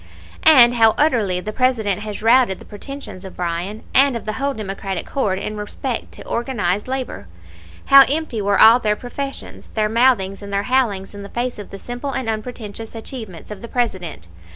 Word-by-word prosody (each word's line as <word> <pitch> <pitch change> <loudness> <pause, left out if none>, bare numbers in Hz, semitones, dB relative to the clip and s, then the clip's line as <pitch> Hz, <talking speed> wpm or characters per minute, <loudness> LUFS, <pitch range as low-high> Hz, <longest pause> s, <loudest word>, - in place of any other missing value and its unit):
"And 245 -6 +8
how 225 -2 +4
utterly 220 - +2
the 215 +3 -5
President 220 -6 +1
has 210 0 -6
routed 235 -4 +4
the - - -14
pretensions 210 -2 -9
of 190 - -9
Bryan, 180 +4 -3
and 270 -2 +5
of - - -10
the 215 - -2
whole 275 +4 -2
Democratic 195 -3 -5
horde 205 -9 0
in 210 +2 -4
respect 225 +4 -4
to - - -9
organized 210 -6 -1
labor! 255 - -4 0.6
How 275 0 +9
empty 290 -7 -1
were 200 0 +1
all 225 +3 +8
their 210 -3 +1
professions, 275 +4 -7
their 215 -1 +1
mouthings 225 -5 +2
and 200 0 -8
their 200 0 0
howlings 215 -7 0
in 205 - -8
the 200 - -9
face 240 0 -3
of 205 - -8
the 195 - -8
simple 245 +6 -5
and 260 -3 -3
unpretentious 225 0 -5
achievements 220 -6 -8
of 210 - -8
the 235 - -7
President! 185 - -3
220 Hz, 185 wpm, -20 LUFS, 200-255 Hz, 0.6 s, How